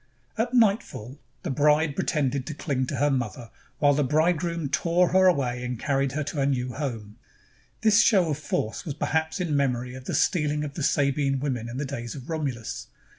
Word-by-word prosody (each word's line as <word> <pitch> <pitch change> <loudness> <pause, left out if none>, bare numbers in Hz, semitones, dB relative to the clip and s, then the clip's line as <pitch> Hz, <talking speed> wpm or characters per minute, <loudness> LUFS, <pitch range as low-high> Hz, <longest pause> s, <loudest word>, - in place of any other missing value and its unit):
At 240 +3 -1
nightfall 195 - +1 0.2
the 175 - -2
bride 150 +1 +3
pretended 140 -4 0
to 155 - -5
cling 135 -6 -1
to 140 - -3
her 145 +3 +2
mother, 120 -2 -3 0.3
while 145 -1 +4
the 145 +1 +2
bridegroom 165 +2 +1
tore 170 +4 +2
her 185 +1 +5
away 125 -8 +1
and 125 -1 -3
carried 135 +1 0
her 155 +1 -1
to 145 - -5
her 140 - +2
new 125 -2 -1
home. 115 -7 -5 0.6
This 215 -1 +5
show 185 -8 +4
of 145 - -2
force 115 -7 -2
was 145 -5 -5
perhaps 160 +3 -1
in 170 -5 -1
memory 125 -3 0
of 130 0 -10
the - - -2
stealing 150 -3 +1
of 145 -2 -5
the 160 - -5
Sabine 140 -1 +1
women 125 -5 -3
in 120 - -6
the 140 - -2
days 120 -4 -5
of 135 +3 -8
Romulus. 135 -8 -4
145 Hz, 195 wpm, -26 LUFS, 130-160 Hz, 0.6 s, her